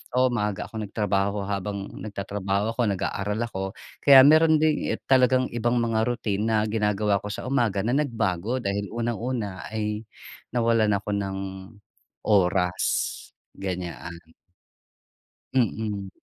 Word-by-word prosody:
Oo, 130 0 +4
maaga 105 -4 -1
akong 110 -2 -5
nagtrabaho 100 -1 0
habang 100 0 -3
nagtatrabaho 100 0 -2
ako 120 - -2
nag-aaral 100 +2 -2
ako. 95 -5 -4 0.4
Kaya 135 -2 +9
mayro'n 155 +1 +6
din 155 -1 +1 0.2
talagang 130 0 +4
ibang 120 +1 0
mga 110 -1 +1
routine 105 -3 -1
na 110 -1 +2
ginagawa 105 -2 +1
ko 105 - -8
sa 105 - -5
umaga 115 -7 +1
na 115 - 0
nagbago 115 - -1
dahil 100 0 -1
unang-una 115 -4 -3
ay 105 0 -3 0.5
nawalan 115 -3 +3
ako 100 +1 -4
ng 100 -1 -1 1.0
oras, 95 -3 +2 0.8
ganyan. 90 -2 -5 1.4
Mm. 105 -5 0
105 Hz, 120 wpm, -25 LUFS, 100-120 Hz, 1.4 s, Kaya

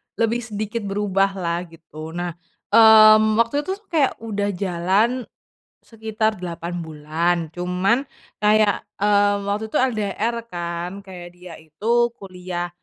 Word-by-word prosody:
lebih 230 +1 0
sedikit 215 +1 -4
berubahlah 195 -3 -1
gitu, 160 0 -10
nah, 175 0 -3 0.4
mmm, 215 -1 +7
waktu 235 +6 +1
itu 380 - -1 0.2
kayak 295 -5 +2
udah 205 -2 -2
jalan, 195 +7 0 0.6
sekitar 220 -1 -2
8 175 -1 -6
bulan 160 +3 -1 0.2
cuman 180 +8 0 0.4
kayak, 210 -1 +3 0.2
mmm, 205 -1 +2
waktu 215 +2 -2
itu - - +1
LDR 225 -2 -1 0.2
kan 175 +2 -5
kayak 180 -3 -10
dia 180 -1 -12
itu 225 +10 0
kuliah 180 -3 -6
200 Hz, 115 wpm, -22 LUFS, 175-220 Hz, 0.6 s, mmm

